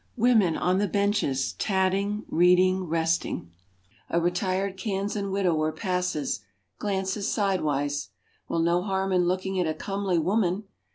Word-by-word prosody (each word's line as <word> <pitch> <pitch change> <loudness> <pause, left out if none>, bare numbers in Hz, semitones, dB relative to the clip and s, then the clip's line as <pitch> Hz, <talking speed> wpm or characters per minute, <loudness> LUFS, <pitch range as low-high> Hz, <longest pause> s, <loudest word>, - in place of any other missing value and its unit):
Women 220 -8 +4
on 185 +1 +1
the 205 - +1
benches 200 -9 0
tatting, 195 +2 0
reading, 180 +2 +4
resting. 165 - -1 0.6
A 170 - +2
retired 185 +3 0
Kansan 200 0 -2
widower 175 -5 +1
passes, 180 - -2 0.4
glances 195 0 -1
sidewise. 145 -8 0 0.4
Well, 165 - 0
no 170 +1 +2
harm 190 0 -1
in 180 -1 +3
looking 185 +1 -1
at 175 - +1
a 155 - -1
comely 195 +1 -1
woman. 185 +3 +1
185 Hz, 125 wpm, -26 LUFS, 170-200 Hz, 0.6 s, Women